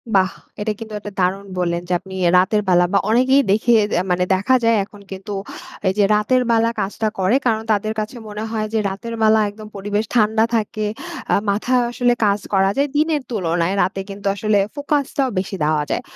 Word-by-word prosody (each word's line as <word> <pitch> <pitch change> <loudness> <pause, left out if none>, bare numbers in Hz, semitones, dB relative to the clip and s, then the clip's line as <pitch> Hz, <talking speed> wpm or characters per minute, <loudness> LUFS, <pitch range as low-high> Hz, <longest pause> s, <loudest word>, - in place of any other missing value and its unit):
বাহ! 185 -1 +3 0.3
এটা 215 +1 0
কিন্তু 220 -1 -8
একটা 205 0 -8
দারুণ 190 +2 0
বললেন 170 -1 0
যে - - +1
আপনি 190 +1 -12
এ্যা 170 - +4
রাতের 210 +3 +2
বেলা 175 -1 +5
বা 200 - +5
অনেকেই 260 +4 +4
দেখি 220 +4 +2 0.3
আ - - -3
মানে 180 0 +2
দেখা 205 +8 +2
যায় 230 0 +4
এখন 205 0 -16
কিন্তু, 195 +2 -6 0.5
এই 190 - +2
যে 205 - +4
রাতের 230 +5 +2
বেলা 230 0 +3
কাজটা 210 +2 -1
করে 190 +6 +2
কারণ 220 -2 +1
তাদের 215 +1 0
কাছে 215 +4 -4
মনে 210 0 -5
হয় 220 -1 -1
যে 220 - +2
রাতের 205 +5 -6
বেলা 220 0 +5
একদম 215 +1 -11
পরিবেশ 205 +2 -2
ঠান্ডা 220 -1 +3
থাকে, 215 -1 -1 0.5
আ - - +5
মাথায় 245 +5 +1
আসলে 245 0 +2
কাজ 200 0 +2
করা 195 0 +4
যায় 280 +1 +2
দিনের 305 -1 +1
তুলনায় 175 -3 0
রাতে 195 - -1
কিন্তু 200 0 -5
আসলে 210 +1 +1 0.2
ফোকাসটাও 285 -2 0
বেশি 195 +1 -4
দেওয়া 150 0 +1
যায়। - - -1
210 Hz, 195 wpm, -20 LUFS, 195-230 Hz, 0.5 s, বেলা